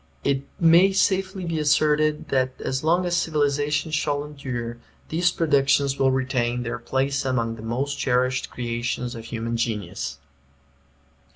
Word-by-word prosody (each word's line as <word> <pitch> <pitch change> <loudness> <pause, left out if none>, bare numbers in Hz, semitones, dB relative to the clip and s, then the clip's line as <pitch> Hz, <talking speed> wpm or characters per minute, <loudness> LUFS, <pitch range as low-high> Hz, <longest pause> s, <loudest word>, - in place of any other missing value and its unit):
It 140 -1 +1 0.2
may 175 +3 +6
safely 190 0 +1
be 165 -2 -2
asserted 150 0 +2
that 130 -1 0
as 130 +1 -2
long 175 +3 +2
as 175 0 0
civilization 150 -1 0
shall 145 -2 0
endure 125 -5 -5 0.3
these 175 +2 +2
productions 140 -3 +2
will 135 - +4
retain 125 -2 0
their 115 0 -4
place 135 +3 -1
among 120 -4 -1
the 110 - -10
most 130 +6 -2
cherished 130 0 +1
creations 120 0 -3
of 115 -2 -8
human 115 0 -3
genius. 95 - -3
135 Hz, 135 wpm, -24 LUFS, 120-155 Hz, 0.3 s, may